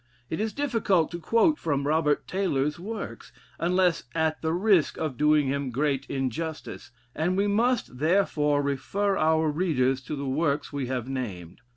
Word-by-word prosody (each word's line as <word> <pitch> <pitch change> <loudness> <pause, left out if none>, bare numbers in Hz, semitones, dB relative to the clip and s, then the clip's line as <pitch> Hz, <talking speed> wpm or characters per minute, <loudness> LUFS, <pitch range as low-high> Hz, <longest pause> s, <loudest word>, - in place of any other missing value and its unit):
It 160 - -2
is 220 +1 -1
difficult 225 - +1
to 170 - -5
quote 230 - +2
from 140 -3 -1
Robert 150 0 +1
Taylor's 155 -6 -1
works, 210 +3 -6 0.3
unless 180 -1 +2
at 160 -1 0
the 160 - 0
risk 180 -1 +2
of 155 -5 -3
doing 150 +2 +3
him 140 0 -1
great 135 +2 -1
injustice, 140 +4 -4 0.2
and 175 +4 0
we 200 - +2
must 220 - 0
therefore 150 -4 +2
refer 195 +9 0
our 160 -1 +2
readers 135 -6 +1
to 150 - -4
the 140 0 -4
works 145 +1 -1
we 140 -3 -2
have 125 -1 -3
named. 100 -8 -5
155 Hz, 160 wpm, -26 LUFS, 140-185 Hz, 0.3 s, doing